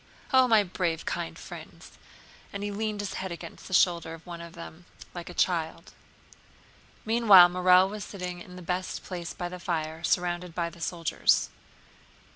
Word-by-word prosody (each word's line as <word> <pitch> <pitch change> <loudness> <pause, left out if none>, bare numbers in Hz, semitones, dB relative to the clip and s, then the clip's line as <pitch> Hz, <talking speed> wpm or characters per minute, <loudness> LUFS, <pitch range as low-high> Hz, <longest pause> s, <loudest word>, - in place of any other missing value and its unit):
Oh, 260 -1 +6
my 220 -3 +5
brave, 175 -3 -2
kind 80 - -4
friends," - - -11 0.6
and 200 0 -5
he 205 - -2
leaned 210 0 -2
his 205 - -4
head 190 -1 -5
against 170 - -9
the 185 - -8
shoulder 170 -2 +2
of 165 - -17
one 170 -1 -8
of 170 0 -10
the 170 - -10
men 175 +2 -20 0.3
like 175 -1 -7
a - - -8
child. 170 0 -1 1.1
Meanwhile 215 -6 +8
Morel 180 +1 +5
was 210 +1 -6
sitting 180 -3 -6
in 180 +1 -11
the 180 - -10
best 180 +2 -3
place 175 -3 -6
by 175 - -4
the 180 +1 -8
fire, 160 -2 -3
surrounded 175 0 -1
by 170 -1 -1
the 170 - -15
soldiers. 165 0 +1
180 Hz, 175 wpm, -28 LUFS, 170-190 Hz, 1.1 s, Meanwhile